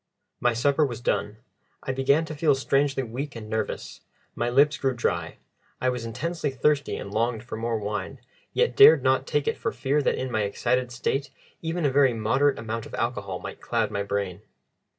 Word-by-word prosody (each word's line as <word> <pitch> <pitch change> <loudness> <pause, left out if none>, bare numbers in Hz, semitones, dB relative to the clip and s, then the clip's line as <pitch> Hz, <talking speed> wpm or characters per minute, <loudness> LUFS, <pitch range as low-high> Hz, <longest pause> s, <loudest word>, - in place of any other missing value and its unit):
My 120 -1 +2
supper 140 +6 +2
was 125 -5 -2
done. 105 -3 -1 0.5
I - - -2
began 135 +4 +2
to 155 - -6
feel 145 -1 +3
strangely 135 0 +1
weak 130 +4 -5
and 110 -2 -7
nervous. 110 +1 -4 0.3
My 120 - -1
lips 145 +4 +4
grew 135 -2 0
dry; 120 - -2 0.4
I 130 - +1
was 125 -2 -3
intensely 145 +7 -2
thirsty 140 +2 +1
and 100 - -7
longed 115 +1 0
for 125 - -7
more 115 +1 -1
wine, 105 -2 -4 0.3
yet 480 0 +1
dared 430 +3 +8
not - - +2
take - - 0
it 455 - 0
for 445 - -1
fear 145 - 0
that - - +1
in 130 -1 -3
my 110 - +1
excited 125 +5 0
state 135 +3 -2 0.3
even 165 0 -2
a 140 - +3
very 135 -3 +4
moderate 135 +6 +2
amount 115 0 -4
of - - -8
alcohol - - -2
might - - -8
cloud - - 0
my 100 - -1
brain. 100 -2 -3
130 Hz, 190 wpm, -26 LUFS, 115-145 Hz, 0.5 s, dared